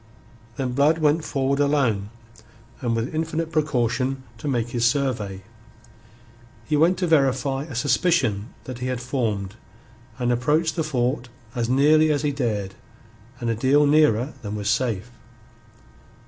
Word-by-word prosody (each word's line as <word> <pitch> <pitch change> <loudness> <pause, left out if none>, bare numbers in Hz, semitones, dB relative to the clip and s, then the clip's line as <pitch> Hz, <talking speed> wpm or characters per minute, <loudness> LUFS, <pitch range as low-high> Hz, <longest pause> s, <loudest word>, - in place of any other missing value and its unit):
Then 130 -1 -2
Blood 145 +5 +3
went 155 0 +2
forward 135 0 -1
alone, 130 -9 +1 0.7
and 120 -3 0
with 115 +5 -2
infinite 160 +1 -2
precaution, 130 -3 0 0.2
to 145 - -6
make 120 -4 0
his 120 -1 -2
survey. 120 -7 0 1.2
He 155 - 0
went 165 +5 +3
to 180 - 0
verify 135 -3 +1
a 150 -6 -9
suspicion 125 - +1
that 130 -2 -7
he 125 - -3
had 130 -1 -2
formed, 115 -7 -2 0.6
and 125 -1 0
approached 150 +7 +1
the 165 - 0
fort 125 -3 -1 0.2
as 120 -2 -2
nearly 155 +4 +4
as 145 0 0
he 145 - +1
dared 110 -8 -2 0.7
and 120 - -3
a - - -1
deal 135 +6 +3
nearer 145 -4 +3
than 105 -1 -5
was 105 0 -1
safe. 120 -3 -1
130 Hz, 145 wpm, -23 LUFS, 120-150 Hz, 1.2 s, nearly